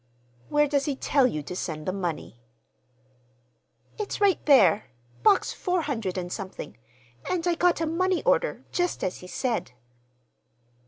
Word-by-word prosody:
"Where 295 0 +3
does 280 -1 +1
he 290 -3 -1
tell 270 -1 +3
you 155 -11 -3
to 180 - -7
send 155 -4 -4
the 185 - -1
money?" 170 -10 -4 1.6
"It's 420 - -3
right 400 -2 +3
there—Box 120 - +3
four 360 -2 -1
hundred 225 -11 -3
and 180 -1 -4
something; 190 - -7 0.5
and 360 -2 -1
I 350 - +3
got 345 0 +2
a - - +2
money 365 +3 0
order, - - +1
just 355 0 -1
as 185 - -2
he 180 - -11
said." 230 - -2
270 Hz, 145 wpm, -26 LUFS, -, 1.6 s, Where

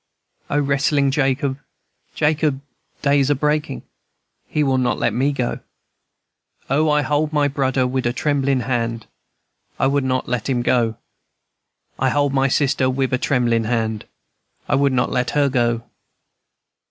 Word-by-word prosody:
O 145 - +1
wrestlin' 140 0 +1
Jacob, 135 0 0 0.6
Jacob, 150 -2 +1 0.4
day's 140 -1 +3
a 145 - +3
breakin'; 150 - -1 0.6
He 150 - 0
will 135 -2 +1
not 125 - 0
let 115 - 0
me 135 +5 +1
go! 125 -4 -2 1.1
O, 155 +3 +3
I 150 0 +2
hold 150 +2 0
my 145 -2 +2
brudder 135 -2 0
wid 125 -1 -1
a - - +1
tremblin' 140 -1 0
hand 115 -3 -2 0.7
I - - +1
would 140 +1 +1
not 130 0 -1
let 125 0 -2
him 125 -2 0
go! 115 -3 +1 1.0
I - - +2
hold 145 -1 +1
my 135 0 +2
sister 130 -1 +1
wid 130 0 -1
a 130 - +1
tremblin' 120 -5 +1
hand; 110 -2 -2 0.6
I - - -1
would 140 0 +3
not 125 -1 0
let 125 -1 0
her 140 -1 +3
go! 120 -3 0
135 Hz, 150 wpm, -20 LUFS, 125-145 Hz, 1.1 s, day's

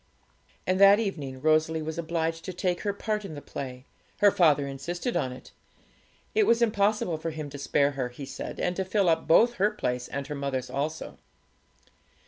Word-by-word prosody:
And 185 +1 +1
that 200 +1 +8
evening 145 -12 -4
Rosalie 155 +1 +2
was 160 +1 -4
obliged 165 0 -2
to 185 - -5
take 180 0 -1
her 205 - 0
part 210 +1 -3
in 190 -6 -7
the - - -6
play; 130 -2 -7 0.3
her 205 -1 +5
father 150 -7 +4
insisted 170 - -4
on 135 -7 0
it; 125 0 -11 0.8
it 430 -1 +3
was 230 - +4
impossible 210 -6 +1
for 165 - -3
him 155 -2 -6
to 145 - -8
spare 140 +1 +2
her, 130 -3 -3
he 130 +3 -8
said, 135 - -7
and 180 - 0
to 190 - 0
fill 190 0 +1
up 160 -1 +1
both 235 +8 +5
her 205 - +5
place 125 -12 -3
and 140 0 -4
her 150 - -5
mother's 140 -3 -3
also. 155 +3 -4
160 Hz, 190 wpm, -27 LUFS, 140-195 Hz, 0.8 s, that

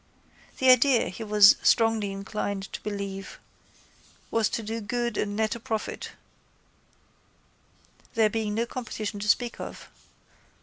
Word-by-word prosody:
The 260 -1 +6
idea, 255 -1 +4
he 190 +5 -7
was 210 -1 +7
strongly 225 -3 +3
inclined 195 0 -4
to - - -5
believe, 200 -2 -5 0.9
was 225 -2 +2
to 230 - -3
do 225 +2 -4
good 235 +1 -2
and 205 0 -2
net 220 0 0
a 235 - -7
profit, 220 -1 -4 2.0
there 225 -1 +4
being 215 -1 -2
no 230 +1 0
competition 220 -4 -5
to 210 - -4
speak 240 +2 +1
of. - - -8
215 Hz, 130 wpm, -26 LUFS, 205-230 Hz, 2.0 s, was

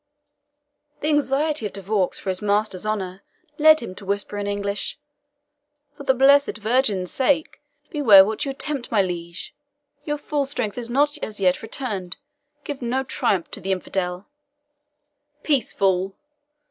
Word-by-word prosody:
The 300 - 0
anxiety 295 -3 +1
of - - -12
De 195 - -7
Vaux 195 -1 0
for 195 - -5
his 185 - -4
master's 210 -1 0
honour 190 -3 -3 0.4
led 310 +1 +7
him 230 - -6
to 190 - -12
whisper 200 +1 -2
in 205 - -3
English, 200 0 -2 1.0
"For - - -11
the 265 -1 +2
blessed 280 0 +5
Virgin's 215 -4 +1
sake, 285 +3 0 0.3
beware 220 - +7
what 220 +5 -2
you 280 - -3
attempt, 275 -1 -3
my 210 -4 +4
liege! 170 -1 -6 0.5
Your 295 0 -2
full 290 -1 -1
strength 250 -5 -3
is 235 -1 -5
not 290 +4 +1
as 210 -1 -5
yet 185 -2 +2
returned 215 -6 -4 0.5
give 285 -2 -6
no 250 +2 -1
triumph 195 -8 -1
to - - -5
the 195 - -2
infidel." 185 0 -2 1.2
"Peace, 280 -7 +1
fool!" 190 0 +1
215 Hz, 150 wpm, -23 LUFS, 195-275 Hz, 1.2 s, led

